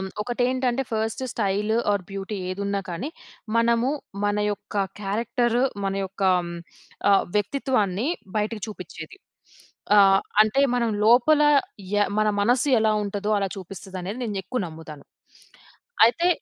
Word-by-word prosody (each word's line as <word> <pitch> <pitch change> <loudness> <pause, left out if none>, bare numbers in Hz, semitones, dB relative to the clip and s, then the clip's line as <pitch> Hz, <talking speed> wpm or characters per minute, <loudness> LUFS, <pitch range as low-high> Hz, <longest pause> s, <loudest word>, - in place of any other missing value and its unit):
ఆహ్, 190 - -4
ఒకటి 245 +2 -2
ఏంటంటే, 255 0 0
ఫస్ట్ 220 +3 -2
స్టైల్ 210 0 0 0.2
ఆర్ 200 -2 -1
బ్యూటీ 195 +1 -5
ఏదున్నా 200 +1 -2
కానీ, 175 - -4 0.5
మనము 235 +2 +2 0.3
మన 205 0 +1
యొక్క 205 +1 -6 0.2
క్యారెక్టర్ 230 +4 0 0.3
మన 195 - -1
యొక్క 195 +1 -11 0.9
ఆహ్, 195 - +4
వ్యక్తిత్వాన్ని 215 -1 0 0.3
బయటకి 210 0 -2
చూపించేది. 205 - -9 0.8
ఆహ్, 195 -1 +6 0.2
అంటే, 220 +6 +1 0.2
మనం 235 -2 +1 0.2
లోపల 275 +6 +5 0.5
య - - +3 0.2
మన 215 - +2
మనస్సు 245 +6 +2
ఎలా 220 -1 +3
ఉంటదో, 205 +1 -3
అలా 195 -1 -1
చూపిస్తది 190 +1 -9
అనేది 205 +8 -5
నేను 205 -3 -3
ఎక్కువ 250 +4 -3
నమ్ముతాను. 160 -2 -11 1.0
అయితే, 335 +9 +2
210 Hz, 130 wpm, -24 LUFS, 195-240 Hz, 1.0 s, ఆహ్